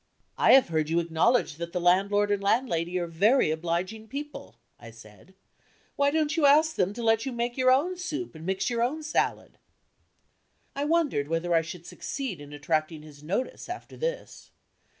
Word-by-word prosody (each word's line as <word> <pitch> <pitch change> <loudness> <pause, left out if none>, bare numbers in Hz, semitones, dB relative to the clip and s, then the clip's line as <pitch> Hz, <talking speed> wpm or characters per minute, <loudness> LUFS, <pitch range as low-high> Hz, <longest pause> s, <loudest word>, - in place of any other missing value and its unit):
"I - - +5
have 265 -7 +6
heard 155 -2 0
you 165 +1 +2
acknowledge 170 +2 +1
that 170 0 -6
the 180 - -1
landlord 200 +4 +2
and 200 -1 0
landlady 185 -5 0
are 175 - -1
very 195 - +3
obliging 175 +7 -3
people," 290 - -8 0.2
I 120 - -11
said. 115 - -16 0.6
"Why 280 0 +3
don't 310 +1 0
you 310 -4 +4
ask 310 +3 +4
them 185 +1 +1
to 235 +2 -6
let 225 +2 +2
you - - -2
make 240 0 -2
your 255 -1 +3
own 305 +8 +2
soup 360 - -5
and 160 -1 -11
mix 190 +2 -1
your 235 -1 -1
own 290 +7 -1
salad?" 300 - -2 1.2
I 280 +1 -1
wondered 300 - +1
whether 165 +2 -1
I 165 - +4
should 170 +1 -9
succeed 235 - -5
in 145 0 -11
attracting 155 +1 -2
his 145 -2 -14
notice, 200 - -4
after 360 - -8
this. - - -5
200 Hz, 180 wpm, -27 LUFS, 165-275 Hz, 1.2 s, have